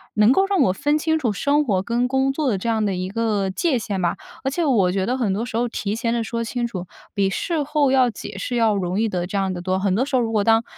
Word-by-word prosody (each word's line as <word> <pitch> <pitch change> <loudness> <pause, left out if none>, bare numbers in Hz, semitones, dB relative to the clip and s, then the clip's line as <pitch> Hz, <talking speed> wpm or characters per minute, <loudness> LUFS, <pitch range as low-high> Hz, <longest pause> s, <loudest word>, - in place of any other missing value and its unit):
能 215 +3 +5
够 385 +8 +4
让 390 -5 +1
我 185 - +3
分 290 +9 +1
清 320 0 +1
楚 245 -9 0
生 290 +7 +1
活 195 -7 +1
跟 240 +4 0
工 265 +1 +1
作 295 +1 -1
的 200 - 0
这 230 - -2
样 220 -1 +1
的 195 -2 0
一 185 +1 -3
个 210 -2 0
界 260 - 0
限 205 -4 -3
吧。 175 -1 0 0.3
而 270 - 0
且 340 +5 -1
我 220 - +3
觉 190 0 0
得 250 +2 0
很 220 -7 0
多 215 +4 -2
时 240 -2 -4
候 240 +1 +1
提 210 -3 -3
前 230 0 -1
地 235 -1 0
说 230 +1 -3
清 240 +1 -2
楚， 185 -6 -6 0.3
比 195 -2 +1
事 325 - -1
后 290 -1 +1
要 255 -2 +4
解 195 - -8
释 245 +5 -3
要 225 -3 +3
容 185 +1 -1
易 225 - +1
得 180 -3 -2
这 195 - -6
样 190 -1 0
得 175 - -5
多。 185 +1 -1
很 190 -1 +1
多 255 +6 +1
时 280 - -2
候， 250 - +3
如 225 -1 -1
果 210 -2 +2
当 225 +1 +4
230 Hz, 315 characters per minute, -22 LUFS, 195-260 Hz, 0.3 s, 能